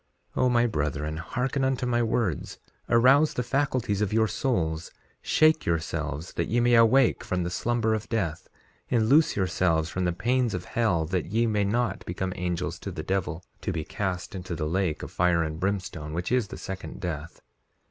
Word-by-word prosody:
3:11 - - 0
O 125 - +4
my 120 -1 +3
brethren, 75 - -2
hearken 125 +10 -2
unto 130 -1 0
my 120 -1 +1
words; 110 - -1 0.3
arouse 130 +6 +5
the 125 - 0
faculties 125 -5 0
of 105 - 0
your 110 0 +3
souls; 85 -11 -1 0.3
shake 155 0 +3
yourselves 85 -1 -2
that - - -1
ye 120 - +1
may 120 0 +3
awake 115 +3 +5
from 90 -1 -1
the 85 - -3
slumber 115 +2 0
of 110 -1 -3
death; 95 -9 -2 0.4
and 115 -3 +2
loose 150 +4 +5
yourselves 85 -3 +1
from 90 0 -1
the 90 - +2
pains 120 +4 0
of 90 - -5
hell 100 -9 +1
that 90 +2 -2
ye 115 +6 +1
may 105 -2 +1
not 120 +4 0
become 90 +1 -3
angels 90 -1 -2
to - - -6
the 80 - -5
devil, 95 -1 -2 0.2
to 100 - -2
be 80 -3 -3
cast 90 +2 -3
into 90 -2 -5
that 80 -1 -2
lake 85 0 -1
of - - -7
fire 85 -2 +2
and 80 0 -4
brimstone 90 -6 -3
which 85 +5 -3
is 125 -4 +2
the - - -8
second 95 0 -7
death. 80 -4 -5
95 Hz, 190 wpm, -27 LUFS, 85-120 Hz, 0.4 s, arouse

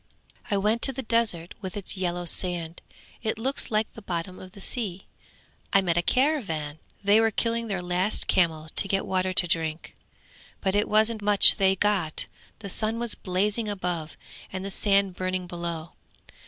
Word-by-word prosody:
I 200 - +1
went 215 +4 +1
to 270 - +3
the 265 0 -6
desert 215 -8 0
with 190 0 -6
its 200 - -3
yellow 175 -2 -2
sand. 170 -1 -1 0.4
It 220 -1 -1
looks 265 +5 -1
like 215 0 0
the 225 - -11
bottom 180 -1 -4
of 185 0 -12
the - - -13
sea. 195 -3 -3 0.7
I 195 - +6
met 175 -3 +1
a 175 - +3
caravan! 185 - 0 0.2
They 205 +2 +5
were 225 - +3
killing 230 +1 -1
their 190 -4 -3
last 180 +4 0
camel 160 -4 +2
to - - +4
get 195 0 0
water 185 0 0
to 180 -1 +6
drink, 160 -1 -2 0.6
but 190 - 0
it 205 +1 +1
wasn't 215 +1 +2
much 205 -1 +6
they 190 -2 +4
got. 190 -5 +1 0.4
The 200 - -6
sun 220 +4 -1
was 235 -1 0
blazing 205 +4 -1
above, 175 -5 -3 0.3
and 190 0 -5
the 195 - -5
sand 195 -1 +2
burning 185 0 -2
below. 170 -1 -5
190 Hz, 175 wpm, -26 LUFS, 175-215 Hz, 0.7 s, I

